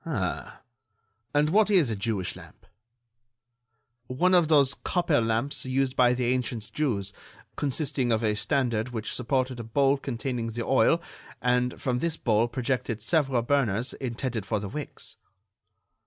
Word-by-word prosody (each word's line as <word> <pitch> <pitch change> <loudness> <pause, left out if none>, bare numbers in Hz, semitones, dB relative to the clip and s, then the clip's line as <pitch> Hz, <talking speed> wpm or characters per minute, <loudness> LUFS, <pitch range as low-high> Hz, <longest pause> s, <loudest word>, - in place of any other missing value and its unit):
"Ah!... 120 - -3 0.7
And 150 +2 +2
what 210 +2 +4
is 175 - +4
a - - -1
Jewish 100 -3 -2
lamp?" - - -14 1.4
"One 175 +9 +2
of 175 -3 +5
those 140 -3 +4
copper 170 -6 +1
lamps 115 +5 -1
used 130 0 0
by 125 -1 +4
the 125 0 -1
ancient 120 -4 -4
Jews, 100 -10 -1 0.4
consisting 135 -3 0
of 110 0 +1
a 105 -1 +2
standard 120 0 0
which 115 -3 -4
supported 130 0 -1
a - - -4
bowl 135 +5 +2
containing 125 -2 -3
the 115 0 -3
oil, 165 +5 +3 0.4
and 125 0 +1
from 125 -2 -1
this 165 +1 -1
bowl 115 -3 +2
projected 120 -2 -2
several 135 -7 +1
burners 120 -3 +1
intended 120 -3 -3
for 105 +2 -1
the 100 -1 -5
wicks." 150 +7 -6
125 Hz, 145 wpm, -27 LUFS, 115-140 Hz, 1.4 s, of